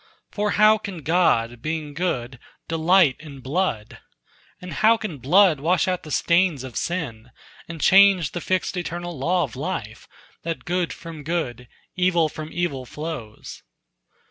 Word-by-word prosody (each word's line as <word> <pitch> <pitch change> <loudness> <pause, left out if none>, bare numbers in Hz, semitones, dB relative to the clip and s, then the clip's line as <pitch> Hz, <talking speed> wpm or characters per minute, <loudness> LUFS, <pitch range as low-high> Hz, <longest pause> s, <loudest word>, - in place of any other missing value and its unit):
For 210 0 -1
how 215 +1 +6
can 190 -7 -7
God, 120 -9 +2
being 155 0 -4
good, 130 -7 -3 0.3
delight 165 -2 +3
in 145 -3 -11
blood? 130 - -2 0.6
And 180 -2 -8
how 225 +1 +4
can 190 -11 -6
blood 170 +3 +4
wash 170 +4 +1
out 180 -1 -1
the 155 - -11
stains 170 -3 +2
of 130 -3 -9
sin, 125 -10 -4 0.4
And 165 -1 -8
change 190 -4 +5
the 175 - -5
fixed 185 +2 -1
eternal 175 0 -4
law 175 +6 +1
of 130 -7 -6
life 130 - -5 0.3
That 165 0 -5
good 175 -1 -1
from 165 -2 -9
good, 140 -7 -3 0.3
evil 175 -3 +2
from 155 +1 -7
evil 140 -8 -3
flows?" 150 -9 -7
165 Hz, 145 wpm, -23 LUFS, 140-180 Hz, 0.6 s, how